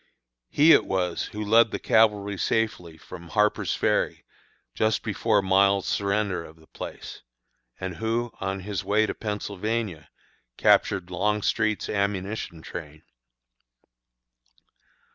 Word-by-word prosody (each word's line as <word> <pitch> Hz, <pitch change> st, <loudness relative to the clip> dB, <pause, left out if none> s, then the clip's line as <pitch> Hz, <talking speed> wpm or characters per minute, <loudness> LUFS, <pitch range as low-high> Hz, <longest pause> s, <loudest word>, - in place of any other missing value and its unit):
He 155 Hz, +3 st, +5 dB
it -, -, +6 dB
was 90 Hz, -2 st, -1 dB
who 105 Hz, 0 st, -6 dB
led 115 Hz, +2 st, +5 dB
the -, -, -3 dB
cavalry 105 Hz, -2 st, +2 dB
safely 90 Hz, -4 st, -1 dB
from 85 Hz, +2 st, -11 dB
Harper's 105 Hz, +5 st, +1 dB
Ferry -, -, 0 dB, 0.5 s
just 110 Hz, 0 st, 0 dB
before 105 Hz, -1 st, +1 dB
Miles' 100 Hz, +1 st, +3 dB
surrender 100 Hz, -3 st, -1 dB
of 80 Hz, -, -13 dB
the 80 Hz, -1 st, -21 dB
place, -, -, -9 dB, 0.6 s
and 90 Hz, -2 st, -5 dB
who, 115 Hz, +1 st, -1 dB
on 95 Hz, 0 st, -3 dB
his 100 Hz, 0 st, -4 dB
way 110 Hz, +1 st, +2 dB
to -, -, -3 dB
Pennsylvania, 105 Hz, -4 st, -4 dB, 0.5 s
captured 95 Hz, -1 st, +2 dB
Longstreet's 105 Hz, +3 st, 0 dB
ammunition 100 Hz, -4 st, -3 dB
train. 75 Hz, -3 st, -9 dB
100 Hz, 115 wpm, -25 LUFS, 90-110 Hz, 0.6 s, it